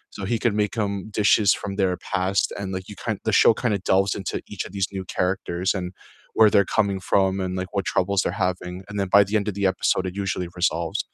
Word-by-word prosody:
So - - -7
he 115 - +1
could 115 -4 +2
make 105 - -1
'em 100 0 -2 0.3
dishes 100 0 +4
from 100 - -4
their 95 -3 +1 0.2
past 95 +1 +2
and, 100 - -4
like, 95 0 -6
you 105 - -8
kind 110 -4 -1
the 110 - +3
show - - +7
kinda 115 -5 +1
delves 95 +1 +3
into 95 - -4 0.2
each - - -3
of 90 - -11
these 95 -1 -1
new 95 - -4
characters, 90 0 -1
and 90 -1 -3 0.5
where 110 -1 +7
they're 100 -1 +4
coming 100 -2 +2
from, 95 -1 +3
and, 90 - -3
like, 95 - -5
what 100 -1 0
troubles 95 +1 +1
they're 100 -2 -2
having, 90 0 -6
and 105 - -8
then 95 -2 -1
by 100 - +8
the 100 +2 -3
end 100 - -5
of 105 - -3
the 100 -1 +2
episode, 95 0 0
it 90 - -12
usually 90 -2 -2
resolves. 85 -2 0
95 Hz, 245 wpm, -23 LUFS, 95-100 Hz, 0.5 s, by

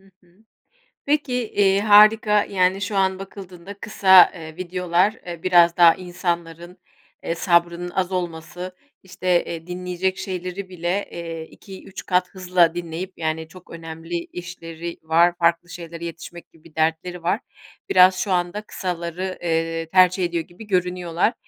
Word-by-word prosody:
Hı 195 0 -23
hı. 180 +5 -28 0.6
Peki, 255 -6 0
iii, 195 -1 +3
harika, 210 0 +6
yani, 185 0 +1
şu 200 +1 -3
an 190 -1 +1
bakıldığında 195 -1 -10
kısa, 190 -4 +6
eee, 160 -1 -10
videolar, 180 +2 0
eee, 170 -2 -7
biraz 175 -2 +5
daha 170 -2 +7
insanların, 175 -1 -5 0.4
eee, 165 - -2
sabrının 170 0 +1
az 185 +1 -2
olması, 175 +1 -5 0.3
işte, 185 -1 0
eee, 165 0 -7
dinleyecek 180 +1 -3
şeyleri 185 +1 -5
bile, 180 +2 -3
eee, 165 -1 -6
2-3 190 0 -11
kat 180 0 +1
hızla 180 -3 +2
dinleyip, 175 +2 -5
yani, 160 0 -3
çok 185 +2 -16
önemli 165 0 -8 0.2
işleri 170 -1 -7
var, 170 +2 +3
farklı 170 +1 +1
şeylere 170 -1 -8
yetişmek 170 +1 -9
gibi 160 - -23
bir 160 - -17
dertleri 165 +2 -1
var. 180 +6 0 0.5
Biraz 185 0 +6
şu 195 -1 -1
anda 175 +3 -1
kısaları, 180 -1 -5
eee, 165 -1 -1
tercih 185 +1 +4
ediyor 170 -1 -2
gibi 185 +5 -14
görünüyorlar. 180 +1 0
180 Hz, 140 wpm, -22 LUFS, 170-190 Hz, 0.6 s, daha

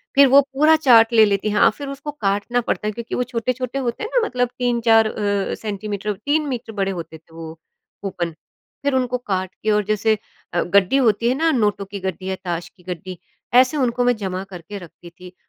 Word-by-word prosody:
फिर 280 0 +7
वो 275 +2 +7
पूरा 305 +3 +5
चार्ट 240 -6 +5
ले 220 -1 +7
लेती 205 +1 0
हाँ, 210 +2 +5
फिर 285 +4 -8
उसको 275 +2 -6
काटना 215 0 -1
पड़ता 210 - -2
है - - 0
क्योंकि 235 +1 -5
वो 250 - 0
छोटे-छोटे 250 +2 -3
होते 240 - -3
हैं 435 - -4
ना 480 - +3
मतलब 250 -1 -1
3-4 235 -2 +3
अ, 205 -2 -1
सेंटीमीटर 210 -1 -4
3 290 +10 -1
मीटर 240 -3 -5
बड़े 195 -2 -1
होते 170 -3 -7
थे 160 +1 -25
वो 160 -1 -8 0.5
कूपन 175 -4 -3 0.5
फिर 285 -1 +1
उनको 250 -1 0
काट 190 -6 -3
के 215 - +2
और 210 0 +2
जैसे 215 +1 +1 0.4
अ, 175 - +1
गड्डी 195 +6 +3
होती 230 -3 +2
है 255 - +1
ना 325 +3 +2
नोटों 210 -6 0
की 200 +1 -7
गड्डी 190 0 -4
या 190 - -1
ताश 175 -1 -3
की 180 - -25
गड्डी 180 0 -7 0.4
ऐसे 255 +4 +5
उनको 245 -2 +1
मैं 245 -1 +3
जमा 190 -2 -4
करके 190 +1 -9
रखती 175 -1 -13
थी 180 +1 -14
215 Hz, 210 wpm, -21 LUFS, 190-250 Hz, 0.5 s, फिर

